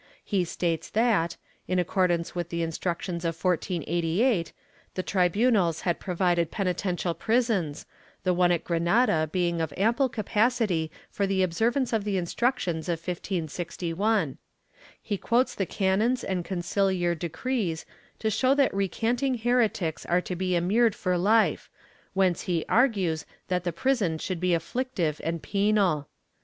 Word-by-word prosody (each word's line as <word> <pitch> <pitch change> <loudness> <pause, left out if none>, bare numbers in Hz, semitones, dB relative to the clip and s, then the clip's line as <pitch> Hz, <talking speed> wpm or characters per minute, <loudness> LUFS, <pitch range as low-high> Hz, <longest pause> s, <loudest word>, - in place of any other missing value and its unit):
He 190 -4 +1
states 165 -1 -2
that, 215 -7 +1 0.3
in 185 - 0
accordance 175 -1 +1
with 175 -1 -3
the 170 -1 -2
Instructions 170 +1 -3
of 165 -1 -2
1488, 175 - 0 0.4
the 185 - -2
tribunals 185 -1 +2
had 175 -2 0
provided 175 -3 +1
penitential 180 -2 -1
prisons, 200 - 0 0.4
the 185 -1 +2
one 175 0 +3
at 170 -2 +1
Granada 170 -1 +2
being 170 -2 0
of 160 -2 -2
ample 235 +7 +2
capacity 215 -6 +1 0.2
for 200 -2 0
the 190 -1 +2
observance 235 +9 0
of 220 -2 +1
the 200 -2 -1
Instructions 180 -3 -1
of 170 - +1
1561. 175 +3 -2 0.6
He 205 - -3
quotes 245 +2 +2
the 195 - -2
canons 210 +6 +1
and 185 -2 -2
conciliar 185 -1 0
decrees 170 +2 -2 0.3
to 220 - -1
show 260 +6 +3
that 280 -2 +3
recanting 230 +7 0
heretics 225 -8 +1
are 175 +1 +2
to 180 - -5
be 185 0 0
immured 210 +6 +3
for 185 -2 -1
hfe, 215 +5 +2 0.5
whence 185 -3 +2
he 170 -2 0
argues 195 -10 +2 0.2
that 180 -1 0
the 175 - 0
prison 195 - 0
should 180 +2 -4
be 180 0 +2
afflictive 170 - -2
and 165 0 -2
penal. 200 -7 +1
185 Hz, 140 wpm, -27 LUFS, 170-220 Hz, 0.6 s, one